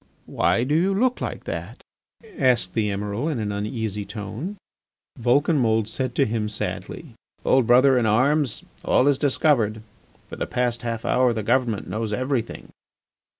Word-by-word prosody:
"My 115 - +1
do 140 +4 -1
you 185 +5 +2
look 250 +4 +1
like - - -4
that?" - - -6 0.5
asked 120 - +2
the 110 -2 0
Emiral 105 +8 -2
in 150 - -2
an 105 -2 -2
uneasy 105 0 -3
tone. 110 - -6 0.6
Vulcanmould 120 -3 +2
said 125 +2 -4
to 140 - +3
him 110 -2 -2
sadly: 105 - -5 0.3
"Old 130 -3 +3
brother 130 +1 +5
in 115 - +1
arms, 130 +3 +2 0.2
all 130 - +3
is 140 -2 +3
discovered. 120 -7 +1 0.4
For - - -9
the - - -3
past 120 -1 -1
half 115 -2 -4
hour 125 -1 +3
the 110 -2 -3
government 120 -2 0
knows 110 0 -3
everything." 130 0 -2
120 Hz, 150 wpm, -23 LUFS, 110-135 Hz, 0.6 s, brother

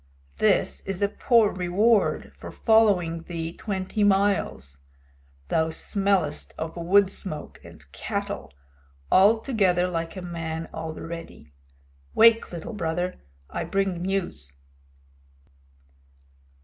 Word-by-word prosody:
"This - - +2
is 195 +1 -2
a - - +4
poor 225 0 +3
reward 195 +5 +1
for - - -9
following 195 -7 +3
thee 165 -1 -5
twenty 195 +1 -2
miles. 195 - +1 0.7
Thou 160 0 +1
smellest 195 -3 -1
of 160 0 -5
wood 190 +3 +3
smoke 155 -7 -4
and - - -14
cattle - - -4 0.6
altogether 195 -3 +4
like 165 -1 -3
a 185 - -6
man 165 -2 -5
already. 160 - -7 0.6
Wake, 230 0 +5
Little 175 +7 -6
Brother; 175 -1 -3 0.3
I - - -4
bring 195 -3 -1
news." 180 - -2
180 Hz, 100 wpm, -25 LUFS, 165-200 Hz, 0.7 s, Wake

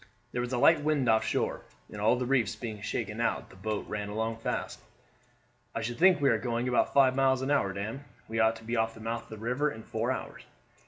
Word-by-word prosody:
There 120 - -1
was 120 +1 -3
a 125 - 0
light 160 +4 +5
wind 145 -4 +1
off 110 -1 +4
shore, - - -1 0.3
and 105 - -7
all 110 +3 +4
the 125 0 -2
reefs 125 -5 +1
being 110 -4 -6
shaken 110 +1 -3
out - - -1
the - - -15
boat 105 +2 -3
ran 105 -1 -4
along 110 +2 -2
fast. 115 - -3 0.9
"I 115 - -1
should 120 +3 -4
think 185 -1 +6
we 140 -2 +4
are 115 - +2
going 120 +1 -1
about 125 - +2
five 130 -2 +5
miles 130 -1 +3
an 135 - -1
hour, 120 -9 +2
Dan. 110 +8 -5 0.2
We 115 0 -2
ought 110 0 +4
to 115 - -12
be 115 +2 -2
off 115 0 0
the - - -12
mouth 115 +1 -3
of - - -20
the 110 - -8
river 125 +7 0
in 110 - -9
four 115 +4 -2
hours. 130 - -5
115 Hz, 245 wpm, -29 LUFS, 110-130 Hz, 0.9 s, think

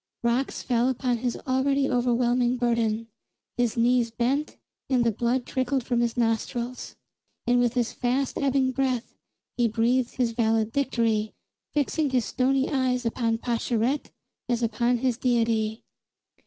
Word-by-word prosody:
Rocks 240 +3 0
fell 245 0 +2
upon 250 -1 0
his 240 +1 -2
already 270 +1 +1
overwhelming 245 0 +1
burden; 230 -2 0 0.5
his 240 0 0
knees 240 0 +3
bent, 255 +6 -1 0.3
and 255 -3 +3
the 230 - +2
blood 240 +4 0
trickled 260 0 -1
from 240 0 0
his 235 0 0
nostrils. 235 +2 -2 0.5
And 245 0 +3
with 245 0 +1
his 240 -2 0
fast 255 +2 -1
ebbing 270 -2 +2
breath 255 -2 -1 0.4
he 240 -1 +3
breathed 235 +3 +1
his 245 -3 +1
valedictory, 225 -1 0 0.4
fixing 295 +1 +1
his 255 -3 +1
stony 265 +1 +1
eyes 255 -3 0
upon 230 0 0
Pascherette 240 +3 -1 0.4
as 240 -1 0
upon 235 +2 +1
his 250 -1 -1
deity. 225 -3 +1
245 Hz, 135 wpm, -26 LUFS, 230-255 Hz, 0.5 s, knees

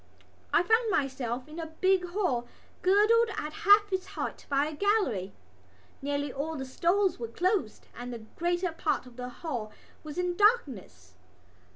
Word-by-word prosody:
I - - +4
found 450 +4 +3
myself 260 - -1
in 310 +2 -9
a 325 - -4
big 375 -1 +3
hall 345 - -1 0.3
girdled 430 +5 +4
at 305 +1 -4
half 410 +3 +5
its 375 0 -1
height - - -5
by 280 0 +2
a 310 - -4
gallery. 295 - +1 0.7
Nearly 285 0 -2
all 310 +4 -3
the 265 - -4
stalls 355 +6 +1
were 230 - -3
closed 355 - -1
and 245 +1 -6
the 235 - -5 0.2
greater 350 +1 0
part 320 - -1
of 250 -1 -14
the 250 0 -5
hall 245 -5 -5 0.3
was 305 0 -8
in 360 -1 0
darkness. 265 - +1
320 Hz, 160 wpm, -29 LUFS, 255-385 Hz, 0.7 s, half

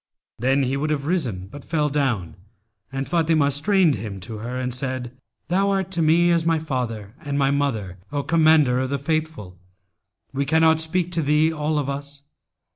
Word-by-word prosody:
Then 135 +3 +2
he 135 +1 0
would 150 +2 -1
have 145 -2 -1
risen, 130 - -1
but 140 +9 -11
fell 150 -2 0
down 135 - -1 0.6
and 135 0 -3
Fatimah 160 -4 +2
strained 170 +3 +3
him 105 -4 -5
to 105 +3 -6
her 120 +3 -5
and 125 -1 -2
said, 130 -1 -4 0.3
'Thou 195 +3 +2
art 190 -1 -1
to 170 -3 -1
me 170 +2 +4
as 170 -1 +2
my 165 0 +2
father 120 -9 -4
and 145 -3 -3
my 140 -1 +2
mother, 110 -11 -1
O 145 -1 -1
Commander 155 -6 +4
of 130 0 -1
the 140 - 0
Faithful! 150 - -3 0.7
We 140 +1 0
cannot 160 +1 +4
speak 175 +2 -1
to 170 - +1
thee, 150 +2 +2
all 155 0 -1
of 145 -2 -1
us.' 140 0 -6
145 Hz, 185 wpm, -23 LUFS, 130-160 Hz, 0.7 s, me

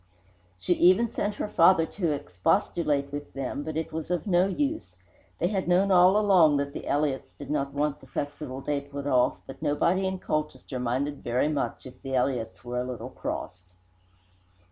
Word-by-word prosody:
She 175 - +1
even 185 +7 +4
sent 205 0 -2
her - - -3
father 165 -3 +5
to 170 -1 -2
expostulate 140 - 0
with 145 0 -6
them, 135 0 -3
but 155 +1 -4
it 160 0 -3
was 160 0 -4
of 175 -3 -1
no 180 -2 +3
use. 290 - -2 0.4
They 175 - +1
had 195 -3 -1
known 185 +3 +3
all 185 +2 +6
along 180 -8 +5
that 140 0 -2
the - - -7
Elliotts 145 -2 -1
did 145 0 -8
not 140 -2 -1
want 150 0 0
the - - -16
festival 145 -2 -5
day 145 0 -1
put 140 0 -7
off, 125 -3 +2
but 135 - -11
nobody 170 +5 +1
in 190 0 -2
Colchester 150 -6 -3
minded 130 +4 -2
very 125 +5 +1
much 145 -2 -2
if 130 - -12
the 135 0 -3
Elliotts 125 -2 -1
were 125 0 -2
a - - -2
little 125 0 -6
crossed. 90 -5 -6
145 Hz, 185 wpm, -27 LUFS, 135-175 Hz, 0.4 s, all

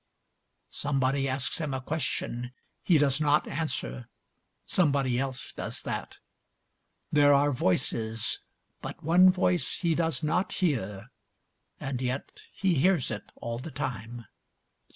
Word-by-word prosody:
Somebody 135 -1 0
asks 130 +4 -1
him 145 -4 -2
a - - -2
question, 125 -4 -3 0.3
he 175 - +4
does 145 0 +2
not 150 0 +3
answer, 65 - -3 0.6
somebody 140 -7 +2
else 130 -1 -3
does - - -4
that. - - -4 0.9
There 145 -1 +6
are 145 +1 +4
voices, 115 -1 0 0.4
but - - -7
one 180 +4 +7
voice 180 -1 +1
he 170 -3 +1
does 165 0 0
not 180 +6 +1
hear, 115 - -1 0.7
and 135 -2 -3
yet 130 +2 -3
he 190 -2 +1
hears 165 -2 +3
it 105 - -6
all 115 0 -4
the 140 - -6
time. 120 -4 -5
140 Hz, 125 wpm, -28 LUFS, 125-160 Hz, 0.9 s, one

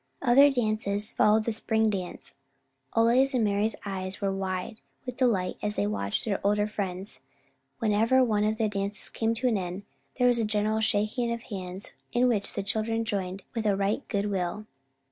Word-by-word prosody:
Other 270 +2 +7
odd 280 - 0
dances 215 -3 -1
followed 215 +1 +4
the 230 - -1
Spring 220 0 +1
Dance. 185 -3 -5 0.6
Ole's 250 +4 +4
and 235 -3 +3
Mari's 205 +2 +1
eyes 190 -1 -3
were 195 -1 0
wide 190 +1 -3
open - - -39 0.2
with 250 -1 -6
delight 210 -8 +1
as 210 0 -2
they - - +1
watched 100 -1 -2
their 200 -3 -1
older 205 +1 +2
friends. 195 -2 -3 0.6
Whenever 225 +4 +3
one 215 -4 +1
of 215 +1 +1
the 220 -1 +1
dances 200 0 -3
came 225 0 0
to 250 +3 0
an 220 -5 +2
end, 180 +2 -5 0.3
there 250 - +3
was 245 -1 +4
a - - +1
general 215 +1 0
shaking 220 +3 0
of 235 0 -4
hands 190 -1 -7 0.2
in 245 +1 +4
which 215 -5 0
the 200 - -3
children 225 +2 -1
joined 195 -3 -3
with 225 -2 -1
a 200 - +3
right 200 +5 0
good 205 -1 -1
will. 190 +2 -2
210 Hz, 190 wpm, -28 LUFS, 195-225 Hz, 0.6 s, Other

